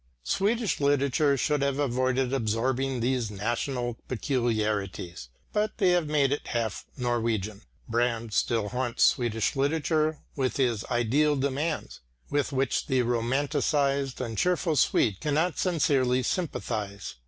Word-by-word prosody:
Swedish 210 Hz, -, 0 dB
literature 140 Hz, 0 st, +2 dB
should 150 Hz, +2 st, +1 dB
have 140 Hz, -1 st, 0 dB
avoided 130 Hz, -1 st, 0 dB
absorbing 130 Hz, +2 st, 0 dB
these 125 Hz, -2 st, 0 dB
national 120 Hz, +4 st, -2 dB
peculiarities, 105 Hz, -, -2 dB, 0.2 s
but 210 Hz, 0 st, 0 dB
they 190 Hz, -4 st, +4 dB
have 175 Hz, -3 st, +2 dB
made 145 Hz, -3 st, +2 dB
it 145 Hz, -, -2 dB
half 115 Hz, -3 st, -2 dB
Norwegian. 115 Hz, -4 st, -1 dB, 0.3 s
Brand 115 Hz, -1 st, 0 dB
still 110 Hz, -1 st, +1 dB
haunts 125 Hz, 0 st, 0 dB
Swedish 115 Hz, -3 st, +2 dB
literature 155 Hz, +2 st, +1 dB, 0.2 s
with 130 Hz, -3 st, -1 dB
his 120 Hz, -6 st, +1 dB
ideal 135 Hz, +6 st, +2 dB
demands, 140 Hz, +4 st, -2 dB, 0.3 s
with 145 Hz, 0 st, 0 dB
which 135 Hz, -1 st, 0 dB
the 130 Hz, -1 st, +2 dB
romanticised 135 Hz, +3 st, 0 dB
and 115 Hz, -4 st, -3 dB
cheerful 180 Hz, -3 st, +1 dB
Swede 105 Hz, -6 st, +2 dB
cannot 155 Hz, +3 st, 0 dB
sincerely 135 Hz, -7 st, +2 dB
sympathise. 110 Hz, -, -3 dB
130 Hz, 120 wpm, -27 LUFS, 115-145 Hz, 0.3 s, they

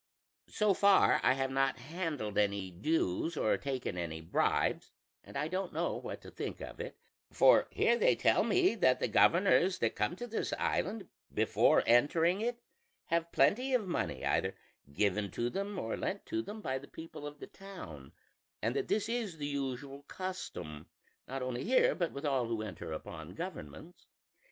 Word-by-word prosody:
"So 210 Hz, -2 st, +2 dB
far 200 Hz, +1 st, +5 dB
I -, -, +5 dB
have 135 Hz, 0 st, -1 dB
not 135 Hz, 0 st, +1 dB
handled 150 Hz, -, -4 dB
any 100 Hz, -2 st, 0 dB
dues 150 Hz, -, 0 dB
or 110 Hz, -, +2 dB
taken 130 Hz, -9 st, -3 dB
any 80 Hz, -2 st, -4 dB
bribes, 80 Hz, +1 st, 0 dB, 0.3 s
and -, -, -8 dB
I 150 Hz, -, 0 dB
don't 185 Hz, +2 st, -3 dB
know -, -, -1 dB
what -, -, -6 dB
to -, -, -11 dB
think -, -, -5 dB
of -, -, -8 dB
it: -, -, -6 dB, 0.3 s
for -, -, +5 dB
here -, -, +3 dB
they -, -, +4 dB
tell -, -, +3 dB
me 370 Hz, -6 st, +3 dB
that 130 Hz, -, +3 dB
the -, -, +1 dB
governors 185 Hz, +1 st, +4 dB
that 115 Hz, -7 st, 0 dB
come 105 Hz, +10 st, 0 dB
to 240 Hz, -, -6 dB
this 230 Hz, -2 st, -3 dB
island, 205 Hz, +2 st, -1 dB, 0.2 s
before -, -, +3 dB
entering 165 Hz, -, +4 dB
it, 240 Hz, +1 st, -2 dB, 0.5 s
have 170 Hz, 0 st, 0 dB
plenty 250 Hz, -, +3 dB
of 215 Hz, -6 st, 0 dB
money 175 Hz, -, -2 dB
either -, -, +1 dB, 0.4 s
given 100 Hz, +5 st, +1 dB
to 120 Hz, +1 st, -1 dB
them 200 Hz, +1 st, -3 dB
or 115 Hz, -9 st, -2 dB
lent 200 Hz, -, -3 dB
to 335 Hz, 0 st, -2 dB
them 215 Hz, -6 st, -8 dB
by 130 Hz, -7 st, -2 dB
the 140 Hz, -, -13 dB
people 160 Hz, -2 st, -9 dB
of 145 Hz, 0 st, -10 dB
the -, -, -7 dB
town; 80 Hz, -, -10 dB, 0.5 s
and 115 Hz, +4 st, -1 dB
that -, -, -1 dB
this 215 Hz, 0 st, 0 dB
is 225 Hz, -7 st, -2 dB
the 145 Hz, -, -4 dB
usual 140 Hz, -1 st, -4 dB
custom, 85 Hz, -, -6 dB, 0.4 s
not 135 Hz, 0 st, -4 dB
only 125 Hz, 0 st, -3 dB
here 255 Hz, +5 st, +4 dB
but 170 Hz, -3 st, -1 dB
with 140 Hz, +2 st, -6 dB
all 135 Hz, -4 st, +1 dB
who 115 Hz, -2 st, -2 dB
enter 95 Hz, -6 st, -7 dB
upon 80 Hz, -, -7 dB
governments. 155 Hz, -, -8 dB
145 Hz, 175 wpm, -33 LUFS, 115-195 Hz, 0.5 s, far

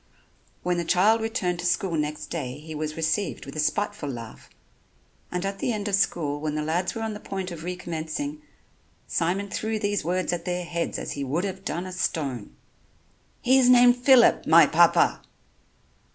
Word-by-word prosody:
When 180 Hz, -1 st, 0 dB
the -, -, -1 dB
child 200 Hz, +7 st, +3 dB
returned 205 Hz, -6 st, -1 dB
to 175 Hz, -, -4 dB
school 180 Hz, -1 st, 0 dB
next 150 Hz, 0 st, -3 dB
day 135 Hz, -5 st, -4 dB
he 155 Hz, +1 st, -9 dB
was 155 Hz, +1 st, -4 dB
received 165 Hz, +5 st, -1 dB
with 140 Hz, -, -9 dB
a -, -, -4 dB
spiteful 205 Hz, 0 st, -1 dB
laugh, 115 Hz, -4 st, -8 dB, 0.8 s
and 180 Hz, +1 st, -2 dB
at 195 Hz, 0 st, -4 dB
the -, -, 0 dB
end 210 Hz, -2 st, -3 dB
of 205 Hz, -, -3 dB
school 160 Hz, -7 st, +1 dB
when 155 Hz, -1 st, -2 dB
the 155 Hz, -, -1 dB
lads 175 Hz, +6 st, -1 dB
were 225 Hz, -, -3 dB
on 220 Hz, -1 st, -3 dB
the 210 Hz, -, -7 dB
point 190 Hz, -3 st, -5 dB
of 165 Hz, -2 st, -8 dB
recommencing, 180 Hz, -, -4 dB, 0.6 s
Simon 185 Hz, +4 st, -1 dB
threw 220 Hz, 0 st, -2 dB
these 205 Hz, -3 st, -1 dB
words 180 Hz, +2 st, -1 dB
at 170 Hz, -1 st, -3 dB
their 180 Hz, 0 st, -2 dB
heads 170 Hz, 0 st, -3 dB
as -, -, -5 dB
he 140 Hz, -, -4 dB
would 145 Hz, +7 st, -1 dB
have 190 Hz, -1 st, -5 dB
done 175 Hz, +1 st, -3 dB
a 185 Hz, -, -7 dB
stone: 140 Hz, -, -3 dB, 0.9 s
"He 260 Hz, +2 st, +5 dB
is 250 Hz, -1 st, +4 dB
named 245 Hz, -1 st, +7 dB
Phillip, 250 Hz, 0 st, +5 dB
my -, -, +8 dB
Papa." -, -, +4 dB
180 Hz, 185 wpm, -25 LUFS, 155-205 Hz, 0.9 s, my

